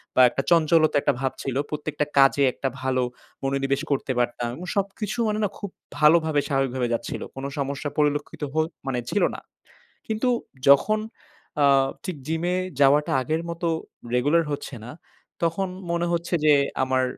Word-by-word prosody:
বা -, -, +6 dB
একটা 135 Hz, -, -2 dB
চঞ্চলতা 165 Hz, -1 st, +4 dB
একটা -, -, +2 dB
ভাব 135 Hz, -1 st, 0 dB
ছিল, 135 Hz, -2 st, -3 dB
প্রত্যেকটা 150 Hz, 0 st, -2 dB
কাজে 135 Hz, +1 st, +5 dB
একটা 135 Hz, -, -3 dB
ভালো 130 Hz, -1 st, +1 dB, 0.4 s
মনোনিবেশ 135 Hz, +1 st, 0 dB
করতে 135 Hz, -1 st, 0 dB
পারতাম। 120 Hz, 0 st, -1 dB
এবং 175 Hz, -, -8 dB
সবকিছু 200 Hz, +2 st, -2 dB
মানে 215 Hz, 0 st, 0 dB
না 200 Hz, -, +1 dB
খুব 200 Hz, -, -6 dB, 0.3 s
ভালোভাবে 155 Hz, 0 st, +4 dB
স্বাভাবিকভাবে 130 Hz, -3 st, 0 dB
যাচ্ছিল। 115 Hz, -, -3 dB
কোন 135 Hz, -, -5 dB
সমস্যা 140 Hz, +1 st, -2 dB
পরিলক্ষিত 150 Hz, +1 st, 0 dB
হো 160 Hz, -, +1 dB, 0.3 s
মানে 125 Hz, -2 st, 0 dB
ছিল 205 Hz, -, +1 dB
না। -, -, -7 dB, 0.7 s
কিন্তু 220 Hz, +3 st, 0 dB, 0.4 s
যখন 215 Hz, +10 st, +5 dB, 0.6 s
আ -, -, +6 dB, 0.4 s
ঠিক 185 Hz, -, -3 dB
জিমে 170 Hz, +3 st, 0 dB, 0.2 s
যাওয়াটা 145 Hz, +2 st, +4 dB
আগের 155 Hz, +5 st, -1 dB
মতো 170 Hz, 0 st, -3 dB, 0.5 s
রেগুলার 145 Hz, +7 st, +3 dB
হচ্ছে 140 Hz, -1 st, -5 dB
না। 125 Hz, -, -8 dB, 0.5 s
তখন 170 Hz, +4 st, 0 dB, 0.2 s
মনে 170 Hz, 0 st, 0 dB
হচ্ছে 170 Hz, +1 st, -2 dB
যে 150 Hz, -, +7 dB, 0.3 s
আমার 130 Hz, 0 st, +1 dB
150 Hz, 155 wpm, -24 LUFS, 135-170 Hz, 0.7 s, যে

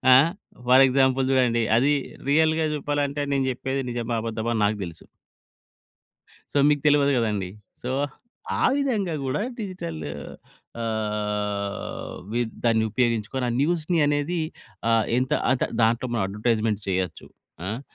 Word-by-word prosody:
ఆహ్, 150 Hz, +6 st, +6 dB, 0.4 s
for 130 Hz, +2 st, +8 dB
example 130 Hz, 0 st, +3 dB
చూడండి, 120 Hz, -3 st, +3 dB
అది 140 Hz, +5 st, +4 dB, 0.4 s
రియల్‌గా 160 Hz, +1 st, +3 dB
చెప్పాలంటే 145 Hz, 0 st, -1 dB
నేను 135 Hz, -1 st, +1 dB
చెప్పేది 130 Hz, +2 st, -2 dB
నిజమా? 120 Hz, -1 st, -2 dB
అబద్దమా? 115 Hz, 0 st, -2 dB
అని 110 Hz, -, 0 dB
నాకు 105 Hz, +1 st, +1 dB
తెలుసు. 85 Hz, -1 st, -10 dB, 1.5 s
సో, -, -, +3 dB
మీకు 145 Hz, -1 st, +3 dB
తెలవదు 145 Hz, -1 st, +5 dB
కదండీ! 105 Hz, -6 st, 0 dB, 0.3 s
సో, 125 Hz, -, -3 dB, 0.7 s
ఆ -, -, +3 dB
విధంగా 220 Hz, -, 0 dB
కూడా 130 Hz, +6 st, -1 dB, 0.2 s
డిజిటల్ 185 Hz, -, -5 dB, 0.8 s
ఆహ్, 105 Hz, -2 st, -3 dB, 0.2 s
విద్ 120 Hz, -1 st, -1 dB
దాన్ని 115 Hz, -1 st, +3 dB
ఉపయోగించుకొని 115 Hz, +2 st, 0 dB
ఆ -, -, 0 dB
న్యూస్‌‌ని 165 Hz, +2 st, +1 dB
అనేది 145 Hz, +4 st, 0 dB, 0.5 s
ఆ -, -, +3 dB, 0.3 s
ఎంత 130 Hz, 0 st, -1 dB, 0.2 s
అంత 130 Hz, -, +2 dB, 0.2 s
దాంట్లో 115 Hz, +3 st, +2 dB
మనం 115 Hz, -, +1 dB
అడ్వర్‌టై‌స్‌మెంట్స్ 110 Hz, +1 st, 0 dB
చేయొచ్చు. 90 Hz, -3 st, -2 dB, 0.4 s
ఆహ్, 110 Hz, +6 st, -3 dB
125 Hz, 125 wpm, -25 LUFS, 110-145 Hz, 1.5 s, for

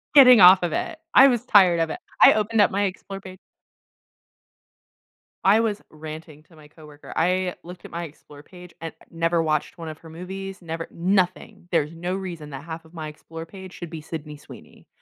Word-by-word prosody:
Getting 250 Hz, -6 st, +9 dB
off 180 Hz, +1 st, +8 dB
of 170 Hz, -3 st, -1 dB
it. 325 Hz, -, -3 dB, 0.2 s
I 270 Hz, -, +9 dB
was 245 Hz, -3 st, +1 dB
tired 185 Hz, -7 st, +5 dB
of 165 Hz, -1 st, 0 dB
it, -, -, -5 dB, 0.2 s
I -, -, +9 dB
opened 215 Hz, +1 st, +1 dB
up -, -, +4 dB
my 200 Hz, +1 st, 0 dB
Explorer 195 Hz, 0 st, -5 dB
pa 185 Hz, -1 st, -10 dB, 2.1 s
I 200 Hz, +3 st, +6 dB
was 220 Hz, -2 st, -1 dB
ranting 155 Hz, 0 st, -10 dB
to 165 Hz, -, -22 dB
my 150 Hz, -1 st, -17 dB
coworker. 150 Hz, -1 st, -14 dB
I 180 Hz, +1 st, +1 dB
looked 180 Hz, +1 st, -11 dB
at -, -, -11 dB
my 170 Hz, +1 st, -4 dB
Explorer 145 Hz, -2 st, -13 dB
page 180 Hz, +1 st, -14 dB
and 165 Hz, 0 st, -7 dB, 0.2 s
never 165 Hz, 0 st, 0 dB
watched 155 Hz, +1 st, -1 dB
one 165 Hz, -2 st, -7 dB
of 155 Hz, -, -8 dB
her 165 Hz, -, -14 dB
movies, 190 Hz, +4 st, -8 dB
never 165 Hz, -1 st, -6 dB
nothing. 180 Hz, 0 st, -1 dB
There's 160 Hz, -2 st, 0 dB
no 175 Hz, +2 st, -4 dB
reason 170 Hz, -6 st, -7 dB
that 135 Hz, -, -8 dB
half 165 Hz, 0 st, -8 dB
of 160 Hz, -, -20 dB
my 155 Hz, -2 st, -6 dB
Explorer 165 Hz, +2 st, -10 dB
page 190 Hz, +1 st, -12 dB
should 175 Hz, -, -8 dB
be 165 Hz, -1 st, -7 dB
Sydney 150 Hz, -1 st, -8 dB
Sweeney, 145 Hz, -, -15 dB
170 Hz, 195 wpm, -23 LUFS, 160-190 Hz, 2.1 s, Getting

